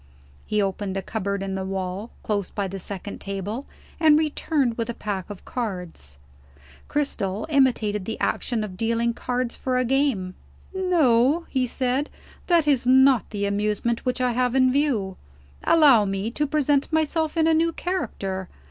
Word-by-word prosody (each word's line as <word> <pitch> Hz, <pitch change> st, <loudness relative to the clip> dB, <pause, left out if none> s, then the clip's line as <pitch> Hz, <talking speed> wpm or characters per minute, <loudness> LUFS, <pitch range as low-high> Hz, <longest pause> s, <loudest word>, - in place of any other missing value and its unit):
He 210 Hz, -1 st, +1 dB
opened 195 Hz, 0 st, -2 dB
a 195 Hz, -, -3 dB
cupboard 200 Hz, -2 st, -3 dB
in 195 Hz, -1 st, -3 dB
the 190 Hz, 0 st, -2 dB
wall, 190 Hz, +3 st, -4 dB
close 205 Hz, -3 st, -1 dB
by 200 Hz, -2 st, -3 dB
the 195 Hz, +1 st, -6 dB
second 200 Hz, +2 st, -7 dB
table, 200 Hz, +6 st, -4 dB, 0.3 s
and 310 Hz, -2 st, +6 dB
returned 295 Hz, -5 st, 0 dB
with 230 Hz, 0 st, -3 dB
a 235 Hz, -, -3 dB
pack 200 Hz, -3 st, -4 dB
of 205 Hz, -3 st, -9 dB
cards. 180 Hz, -, -5 dB, 0.7 s
Cristel 220 Hz, -9 st, -2 dB
imitated 235 Hz, -8 st, +2 dB
the 225 Hz, -, -4 dB
action 230 Hz, -3 st, -1 dB
of 190 Hz, -3 st, -7 dB
dealing 230 Hz, +2 st, 0 dB
cards 250 Hz, 0 st, -2 dB
for 255 Hz, -1 st, -1 dB
a 255 Hz, -, +1 dB
game. 250 Hz, -8 st, +1 dB, 0.4 s
"No," 325 Hz, -5 st, +3 dB
he 255 Hz, -2 st, 0 dB
said, 260 Hz, +4 st, -1 dB, 0.4 s
"that 335 Hz, -4 st, +3 dB
is 265 Hz, -4 st, +2 dB
not 265 Hz, -2 st, +5 dB
the 205 Hz, -2 st, -2 dB
amusement 210 Hz, +3 st, -1 dB
which 250 Hz, 0 st, -1 dB
I 250 Hz, -1 st, +2 dB
have 250 Hz, +1 st, 0 dB
in 255 Hz, -1 st, +4 dB
view. 250 Hz, -10 st, 0 dB, 0.5 s
Allow 280 Hz, -10 st, +6 dB
me 195 Hz, +3 st, -2 dB
to 295 Hz, +4 st, -1 dB
present 290 Hz, -1 st, +1 dB
myself 315 Hz, 0 st, 0 dB
in 320 Hz, -, +4 dB
a 325 Hz, -, +4 dB
new 330 Hz, +1 st, +2 dB
character. 195 Hz, -, -3 dB
235 Hz, 165 wpm, -24 LUFS, 200-280 Hz, 0.7 s, and